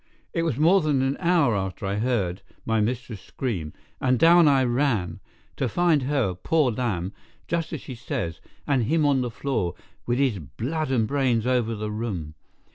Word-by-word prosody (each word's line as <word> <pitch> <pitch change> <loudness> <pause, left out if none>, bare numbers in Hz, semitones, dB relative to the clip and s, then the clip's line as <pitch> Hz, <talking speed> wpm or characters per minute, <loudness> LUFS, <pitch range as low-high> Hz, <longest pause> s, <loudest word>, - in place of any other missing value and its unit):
It 165 - 0
was 160 -7 -1
more 175 +6 +5
than 145 -4 +1
an 135 +1 0
hour 170 - +3
after 95 0 -3
that 95 - -1
I 100 - -1
heard 105 -7 0 0.2
my 115 -1 +1
mistress 115 -2 -3
scream, 95 - -4 0.3
and 130 -1 +2
down 170 +3 +6
I 135 -2 +4
ran, 120 -9 0 0.4
to 130 - 0
find 170 +2 +2
her, 130 -8 0
poor 130 - +1
lamb, 105 -6 -2 0.3
just 165 -2 -2
as 155 - -4
she 130 - -8
says, 120 - -4 0.2
and 130 -5 +1
him 155 +5 +2
on 140 -2 +3
the 125 - -2
floor, 110 -7 -2 0.3
with 120 0 +1
his 130 -7 +1
blood 125 - -3
and 120 -5 +1
brains 130 -5 +1
over 120 -3 +1
the 105 0 -4
room. 100 -9 -4
125 Hz, 185 wpm, -25 LUFS, 105-145 Hz, 0.4 s, down